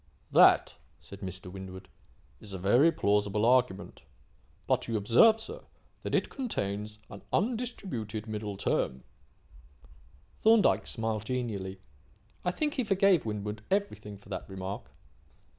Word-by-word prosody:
"That," -, -, +6 dB, 0.2 s
said 100 Hz, -, -12 dB
Mr. 95 Hz, -1 st, -5 dB
Winwood, 95 Hz, -1 st, -9 dB, 0.5 s
"is 105 Hz, -3 st, -10 dB
a -, -, -3 dB
very 120 Hz, -, +4 dB
plausible 105 Hz, -5 st, +1 dB
argument. 120 Hz, -5 st, +1 dB, 0.6 s
But, -, -, +1 dB
you 115 Hz, -1 st, 0 dB
observe, 120 Hz, -, +5 dB
sir, 460 Hz, -, -7 dB, 0.4 s
that -, -, -2 dB
it -, -, +2 dB
contains 105 Hz, -, -3 dB
an 100 Hz, -, -9 dB
undistributed 185 Hz, -, -2 dB
middle 105 Hz, -2 st, -5 dB
term." 65 Hz, -8 st, -1 dB, 1.4 s
Thorndyke 220 Hz, -1 st, +4 dB
smiled 110 Hz, -2 st, -2 dB
genially. 105 Hz, -7 st, -3 dB, 0.6 s
I -, -, +1 dB
think 295 Hz, +11 st, -1 dB
he 255 Hz, -, 0 dB
forgave 195 Hz, -, +3 dB
Winwood 105 Hz, 0 st, -4 dB
everything 195 Hz, -, -2 dB
for 100 Hz, -, -19 dB
that 95 Hz, -1 st, -5 dB
remark. 95 Hz, +1 st, -6 dB
110 Hz, 125 wpm, -30 LUFS, -, 1.4 s, That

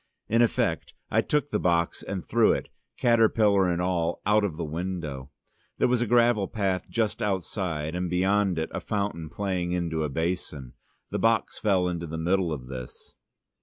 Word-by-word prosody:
In 115 Hz, +2 st, +3 dB
effect, 120 Hz, -, 0 dB, 0.2 s
I -, -, +4 dB
took 145 Hz, -1 st, 0 dB
the -, -, +1 dB
box 85 Hz, -1 st, +1 dB
and 95 Hz, -3 st, -5 dB
threw -, -, +4 dB
it, -, -, -4 dB, 0.3 s
caterpillar 110 Hz, -5 st, +4 dB
and 85 Hz, -1 st, 0 dB
all, 85 Hz, -2 st, 0 dB
out 105 Hz, +1 st, +4 dB
of 90 Hz, -7 st, -2 dB
the 85 Hz, -, -3 dB
window. 80 Hz, -4 st, -4 dB, 0.5 s
There -, -, +3 dB
was 125 Hz, -1 st, +2 dB
a 120 Hz, -, +1 dB
gravel 120 Hz, -3 st, +3 dB
path 95 Hz, -4 st, -2 dB
just 110 Hz, -2 st, -1 dB
outside, 90 Hz, -5 st, -2 dB
and 90 Hz, 0 st, -2 dB
beyond 95 Hz, +1 st, +2 dB
it, 80 Hz, -, -2 dB
a -, -, -3 dB
fountain 100 Hz, -6 st, -3 dB
playing 90 Hz, -1 st, -2 dB
into 85 Hz, -3 st, -1 dB
a 75 Hz, -, -1 dB
basin. 75 Hz, -4 st, -3 dB, 0.4 s
The -, -, -1 dB
box 115 Hz, 0 st, +1 dB
fell 95 Hz, -4 st, +2 dB
on 90 Hz, -1 st, -2 dB
to 85 Hz, -, -5 dB
the 80 Hz, +1 st, -5 dB
middle 90 Hz, +1 st, +1 dB
of 70 Hz, -5 st, -4 dB
this. 65 Hz, -1 st, -9 dB
90 Hz, 180 wpm, -27 LUFS, 85-105 Hz, 0.5 s, I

